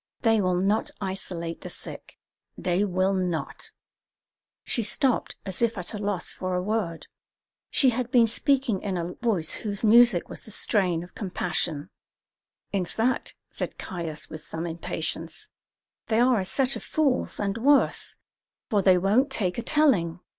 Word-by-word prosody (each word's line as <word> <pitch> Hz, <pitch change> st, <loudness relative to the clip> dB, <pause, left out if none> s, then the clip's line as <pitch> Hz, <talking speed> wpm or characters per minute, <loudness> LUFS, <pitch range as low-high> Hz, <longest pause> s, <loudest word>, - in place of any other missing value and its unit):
They 225 Hz, -2 st, +3 dB
will 185 Hz, -1 st, +1 dB
not 195 Hz, +4 st, +1 dB
isolate 185 Hz, -4 st, -5 dB
the -, -, -7 dB
sick; -, -, -9 dB, 0.4 s
they 180 Hz, +2 st, +1 dB
will 190 Hz, 0 st, +1 dB
not 175 Hz, -6 st, -2 dB, 0.5 s
" -, -, -67 dB
She 235 Hz, -, +1 dB
stopped 255 Hz, +3 st, +1 dB
as 190 Hz, +1 st, -5 dB
if 230 Hz, -2 st, +1 dB
at 180 Hz, +2 st, -2 dB
a 210 Hz, -, -4 dB
loss 200 Hz, -3 st, -2 dB
for 185 Hz, -1 st, -3 dB
a 180 Hz, -, -1 dB
word. 195 Hz, -6 st, -2 dB, 0.6 s
She 265 Hz, -3 st, +4 dB
had 245 Hz, 0 st, -2 dB
been 245 Hz, -2 st, +5 dB
speaking 240 Hz, -2 st, +1 dB
in 195 Hz, -3 st, -2 dB
a 175 Hz, +1 st, -3 dB
voice 200 Hz, -10 st, -1 dB
whose 205 Hz, -1 st, -5 dB
music 225 Hz, -4 st, +6 dB
was -, -, -8 dB
the -, -, -8 dB
strain 185 Hz, -5 st, +2 dB
of 175 Hz, -, -13 dB
compassion. 175 Hz, -4 st, -2 dB, 0.8 s
"In 195 Hz, -3 st, 0 dB
fact," 225 Hz, +8 st, -1 dB, 0.2 s
said -, -, -5 dB
Caius, 165 Hz, -5 st, -4 dB
with 155 Hz, -1 st, -8 dB
some 165 Hz, +2 st, -5 dB
impatience, 165 Hz, -, -4 dB, 0.6 s
"they 220 Hz, 0 st, +2 dB
are 245 Hz, -2 st, +4 dB
a 190 Hz, -, -2 dB
set 265 Hz, +7 st, 0 dB
of -, -, -5 dB
fools, 295 Hz, -5 st, 0 dB
and 205 Hz, +2 st, -1 dB
worse, 280 Hz, +4 st, +3 dB, 0.6 s
for 205 Hz, -2 st, +3 dB
they 185 Hz, -1 st, +5 dB
won't 210 Hz, +10 st, +3 dB
take 200 Hz, -7 st, 0 dB
a -, -, -1 dB
telling. 225 Hz, -, +2 dB
195 Hz, 160 wpm, -26 LUFS, 175-230 Hz, 0.8 s, music